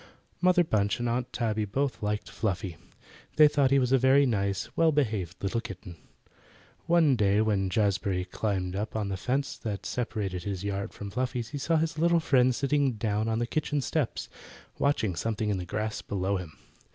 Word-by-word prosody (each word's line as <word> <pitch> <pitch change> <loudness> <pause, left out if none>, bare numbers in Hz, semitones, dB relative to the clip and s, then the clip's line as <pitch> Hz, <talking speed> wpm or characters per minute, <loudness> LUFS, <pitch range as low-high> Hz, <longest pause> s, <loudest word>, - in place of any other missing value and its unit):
Mother 180 0 +5
Bunch 105 -9 +1
and 120 - -1
Aunt 120 +1 -1
Tabby 110 -3 -1
both 130 +6 -2
liked 105 0 -2
Fluffy. 95 -5 -3 0.6
They 155 -1 +8
thought 145 -2 +2
he 140 - +4
was 125 -2 +2
a 135 - +5
very 135 +2 +5
nice, 100 -5 -1
well 165 -1 +4
behaved 105 - -1
little 115 +4 0
kitten. 95 -5 -9 0.9
One 165 -5 +4
day 105 -2 +3
when 105 -3 +1
Jazbury 100 -3 0
climbed 95 -1 -2
up 105 +3 -3
on 105 -2 -1
the 95 - -2
fence 135 +9 -1
that 105 -4 -4
separated 105 -7 -3
his 95 -1 -4
yard 100 -1 -3
from 100 -1 -8
Fluffy's 125 -1 -2
he 145 - -5
saw 165 +4 +1
his 160 0 -1
little 170 +1 +4
friend 130 -5 +3
sitting 140 -1 +1
down 110 0 -1
on 110 0 0
the 120 - 0
kitchen 150 +3 -1
steps, 140 -1 -2 0.5
watching 110 -10 +1
something 110 +1 -1
in 95 - -1
the 90 - -5
grass 110 +3 -3
below 100 0 -1
him. 85 -4 -8
110 Hz, 185 wpm, -28 LUFS, 100-135 Hz, 0.9 s, They